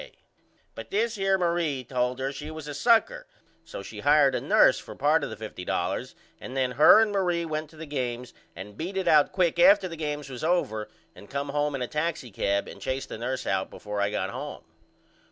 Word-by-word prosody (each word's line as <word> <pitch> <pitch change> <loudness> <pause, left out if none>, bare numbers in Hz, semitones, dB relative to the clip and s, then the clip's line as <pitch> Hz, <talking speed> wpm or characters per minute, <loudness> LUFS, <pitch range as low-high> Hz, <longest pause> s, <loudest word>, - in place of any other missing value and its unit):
K. - - -13 0.6
But - - -9
this 220 +3 0
here 195 -2 +1
Marie 170 -6 0
told 125 0 -1
her 135 +1 -2
she 145 +2 -7
was 155 -1 -8
a 150 - -5
sucker 245 - +2 0.4
so - - -8
she - - -9
hired 145 -2 +4
a - - -1
nurse - - +4
for - - -10
part 150 +2 +2
of - - -3
the 110 - -6
$50.00 110 -4 -4 0.2
and 130 - -7
then 130 -1 +1
her 150 - +7
and 220 -1 +3
Marie 175 -4 0
went 155 -1 -4
to 160 - -18
the 160 +1 -8
games 125 -4 -4 0.2
and 100 +2 -9
beat 180 - -5
it 190 -2 -1
out 150 -3 +5
quick 175 -2 +1
after 195 +2 +6
the 165 - -7
games 150 -2 -4
was 130 -1 -8
over 110 -11 0 0.2
and 100 - -15
come 140 0 -3
home 145 0 0
in 130 - -2
a - - -3
taxicab 125 - -2
and 100 - -11
chased 130 +5 -3
the - - -7
nurse 130 +2 -3
out 95 -1 -1
before 105 -1 -5
I 100 - +1
got - - -2
home. - - -7
150 Hz, 215 wpm, -26 LUFS, 125-175 Hz, 0.6 s, her